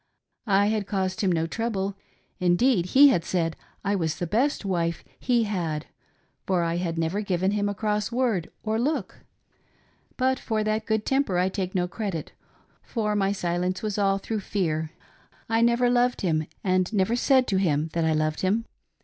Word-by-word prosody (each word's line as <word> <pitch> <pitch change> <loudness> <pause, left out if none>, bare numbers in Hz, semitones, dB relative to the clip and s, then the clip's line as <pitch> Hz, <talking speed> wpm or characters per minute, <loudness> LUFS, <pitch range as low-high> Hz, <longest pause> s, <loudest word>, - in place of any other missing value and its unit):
I 200 0 +4
had 210 -1 0
caused 190 +1 -1
him 195 -3 +2
no 165 -1 +1
trouble; 200 0 -2 0.4
indeed, 180 +2 +3
he 280 +8 +7
had 175 -11 +2
said 165 -2 -1 0.3
I 200 - +1
was 165 -5 0
the 175 - -3
best 235 - 0
wife 170 -3 -1 0.2
he 240 -2 +2
had, 170 -8 -2 0.6
for 180 -3 +2
I 170 0 0
had 170 -2 -2
never 165 +5 0
given 190 -1 0
him 205 0 0
a 205 - -3
cross 210 +1 -1
word 235 -9 0
or 220 0 0
look. 265 -5 -2 1.0
But 260 0 +1
for 220 -2 -1
that 215 +1 -1
good 220 -1 0
temper 270 -9 +1
I 180 +1 +2
take 190 -1 -4
no 180 -1 +1
credit, 185 -5 -4 0.5
for 210 -3 -2
my 195 -1 +2
silence 180 0 -1
was 210 -1 -2
all 195 -1 +3
through 215 +2 -3
fear. 160 -6 -1 0.6
I 225 0 +2
never 235 +1 +3
loved 245 0 +2
him 160 -4 0 0.2
and 185 0 +1
never 210 +2 +1
said 260 +1 +4
to 195 - +2
him 160 -4 +1
that 170 - 0
I 160 0 +2
loved 155 0 0
him. 210 +5 +1
195 Hz, 180 wpm, -26 LUFS, 175-220 Hz, 1.0 s, he